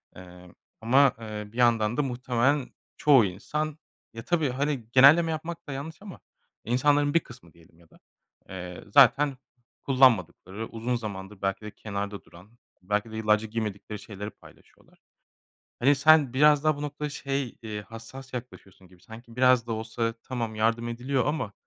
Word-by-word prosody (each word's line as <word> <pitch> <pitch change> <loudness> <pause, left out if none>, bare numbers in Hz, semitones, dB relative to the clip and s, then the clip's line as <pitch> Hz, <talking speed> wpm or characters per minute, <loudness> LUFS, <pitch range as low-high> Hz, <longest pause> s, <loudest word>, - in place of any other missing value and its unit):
Emm, 90 -1 -14 0.3
ama, 130 +4 +4
eee, 105 -2 -7
bir 115 - -14
yandan 115 -2 +2
da - - +3
muhtemelen 130 +1 0 0.3
çoğu 135 -7 +5
insan 150 +11 -4 0.4
ya, 115 0 -8
tabii, 160 -3 +1
hani, 135 -1 -2
genelleme 150 +6 +6
yapmak 160 +2 -6
da - - -6
yanlış 155 +5 -7
ama 200 -3 -10 0.4
insanların 145 +4 +2
bir 170 - +5
kısmı 120 - -16
diyelim 85 0 -22
ya 85 -2 -23
da, - - -22 0.5
eee, 90 -1 -8
zaten 140 +1 +5 0.5
kullanmadıkları 110 - +2
uzun 115 +2 -3
zamandır 100 -3 -7
belki 95 +1 -1
de 105 - -7
kenarda 100 -1 -6
duran 90 +5 -17 0.3
belki 105 +4 -2
de 110 - -6
yıllarca 110 0 +1
giymedikleri 105 -1 -5
şeyleri 105 -1 -8
paylaşıyorlar. - - -21 0.8
Hani, 140 +4 +4
sen 145 -2 +5
biraz 150 +1 +5
daha 155 -1 +2
bu - - -7
noktada 150 0 -4
şey, 140 -3 -4
iii, 105 -2 -6
hassas 115 +6 -11
yaklaşıyorsun 100 -6 -9
gibi 90 -1 -22
sanki 115 +1 -13
biraz 125 -2 +4
da 115 - -2
olsa 115 +1 -3
tamam 115 -4 -4
yardım 115 +2 0
ediliyor 125 +2 -1
ama, 145 -8 -2
120 Hz, 160 wpm, -27 LUFS, 105-140 Hz, 0.8 s, genelleme